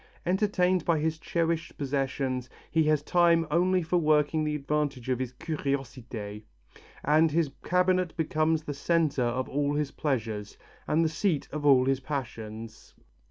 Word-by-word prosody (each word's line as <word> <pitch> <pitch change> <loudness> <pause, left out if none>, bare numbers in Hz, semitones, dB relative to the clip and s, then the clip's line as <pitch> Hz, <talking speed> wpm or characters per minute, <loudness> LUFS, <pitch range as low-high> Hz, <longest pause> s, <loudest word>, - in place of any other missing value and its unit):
Entertained 185 -1 +2
by 170 -1 +2
his 160 +1 -1
cherished 165 0 -1
possessions, 135 -2 -2 0.2
he 160 -1 +3
has 150 -1 +2
time 170 0 +4
only 180 +2 +3
for 175 +2 +1
working 155 -1 +2
at - - 0
the 150 0 -1
advance 150 -1 -1
of 125 0 -2
his 130 -2 -3
curiosité, 130 -8 -4 0.6
and 155 +3 +4
his 155 -2 +1
cabinet 180 -1 +1
becomes 155 0 +1
the 150 - -4
centre 155 -1 +1
of 125 +2 0
all 145 +1 0
his 145 -1 -1
pleasures, 110 -9 -3 0.3
and 165 +2 +2
the - - +4
seat 160 0 0
of 145 0 -2
all 130 -2 +6
his 135 0 +1
passions." 115 -5 -6
150 Hz, 155 wpm, -28 LUFS, 130-165 Hz, 0.6 s, all